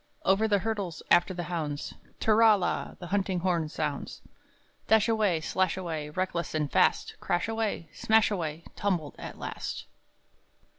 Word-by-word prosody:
Over 195 +3 +4
the 205 -2 +3
hurdles 200 -5 -3
after 175 +2 +5
the 175 -1 -4
hounds, 155 -5 -3 0.3
tirra 220 -1 +5
la! 180 - -2
the 180 - -8
hunting 190 -1 0
horn 170 -4 0
sounds 150 -2 -4 0.6
Dashaway, 220 -6 +3
slashaway, 165 -3 -1
reckless 170 0 -2
and 150 -2 -1
fast! - - +2
Crashaway, 210 0 -1
smashaway, 180 -8 +1
tumbled 175 -8 -1
at - - -7
last! - - -5
185 Hz, 120 wpm, -29 LUFS, 165-205 Hz, 0.6 s, after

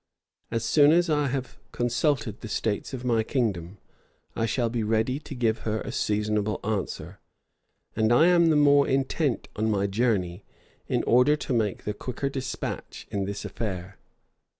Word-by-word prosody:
As 115 0 -2
soon 145 +4 +5
as 170 0 +3
I 150 -1 +2
have 130 -1 -4
consulted 120 -2 0
the - - -6
states 105 0 -2
of 130 -2 -6
my 115 -2 +2
kingdom, 105 - -2 0.6
I 115 - 0
shall 120 0 0
be 115 0 -2
ready 110 +5 0
to 150 - -9
give 115 -3 +1
her 110 0 -2
a - - -5
seasonable 105 0 0
answer; 105 -2 -3 0.8
and 110 +1 +2
I 120 +7 +6
am 175 -1 +5
the 155 - +4
more 145 -1 +5
intent 135 0 0
on 110 +1 0
my 100 -2 +1
journey, 100 -4 0 0.4
in - - 0
order 125 +5 +4
to 150 -3 -4
make 110 -4 0
the 105 - -2
quicker 125 +5 -4
despatch 130 -2 -5
in 100 -1 -1
this 100 +1 -5
affair. 95 -3 -5
115 Hz, 165 wpm, -26 LUFS, 105-135 Hz, 0.8 s, I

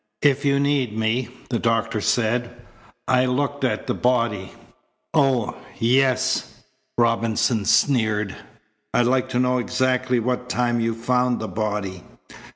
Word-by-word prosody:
"If 140 -1 +3
you 140 0 +3
need 140 -6 0
me," 110 +2 0 0.2
the 120 - 0
doctor 115 -1 0
said. 120 +2 +1 0.6
"I 130 0 +3
looked 140 +2 -1
at 110 -4 0
the - - -1
body 115 -6 0 0.3
" - - -45 0.2
"Oh, 135 -7 +2 0.2
yes," 130 +2 +1 0.3
Robinson 115 -1 +1
sneered. 110 -3 +2 0.6
"I'd 120 - +4
like 130 +1 +1
to 125 -1 -1
know 125 0 +2
exactly 130 0 0
what 125 +1 -2
time 120 -1 0
you 115 0 0
found 125 +1 +1
the 110 - -4
body." 105 -4 -3
120 Hz, 135 wpm, -22 LUFS, 110-130 Hz, 0.6 s, I'd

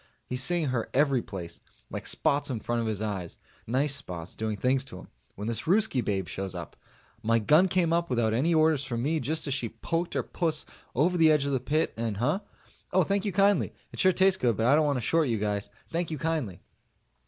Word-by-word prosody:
He's 125 0 -2
seeing 165 +1 +1
her 120 -3 -2
every 135 -3 +3
place 95 -5 -8 0.3
like - - -5
spots 145 +1 +1
in 125 -4 -2
front 120 +2 -1
of 115 - -2
his 110 -1 -2
eyes 95 -5 -4 0.3
nice 135 +5 +1
spots 90 -11 -6
doing 110 -1 -3
things 130 +5 +1
to 90 - -9
him, 95 - -12 0.3
when 105 +2 -5
this 115 +4 -2
Ruskie 195 - +3
babe 95 -3 -1
shows 95 -1 -5
up. - - -7 0.5
My 115 +1 +2
gun 150 - +5
came 180 -3 +1
up 170 0 +1
without 115 -3 +1
any 140 +9 +2
orders 155 -3 +3
from 120 -4 -3
me 155 +3 +1
just 155 +4 -1
as 140 - -1
she 125 -4 -1
poked 165 +10 -3
her - - +1
puss 160 -3 -1 0.3
over 170 +8 +2
the 160 -2 +6
edge 150 -2 +3
of 140 - -1
the 135 - +1
pit, 150 +6 0
and 115 -3 -2
huh? 145 - +1 0.5
Oh, 185 - +4
thank 200 +4 0
you 205 - 0
kindly. 200 +2 +3 0.2
It - - -10
sure 185 - +5
tastes 190 +1 +3
good 120 -5 +2
but 110 - +1
I 125 - +5
don't 150 0 +4
want 140 -2 +1
to - - -2
short 160 +6 +2
you 115 -3 0
guys. 105 -1 -2 0.2
Thank 170 +1 -1
you 155 - -3
kindly. 145 - -2
135 Hz, 230 wpm, -28 LUFS, 115-160 Hz, 0.5 s, the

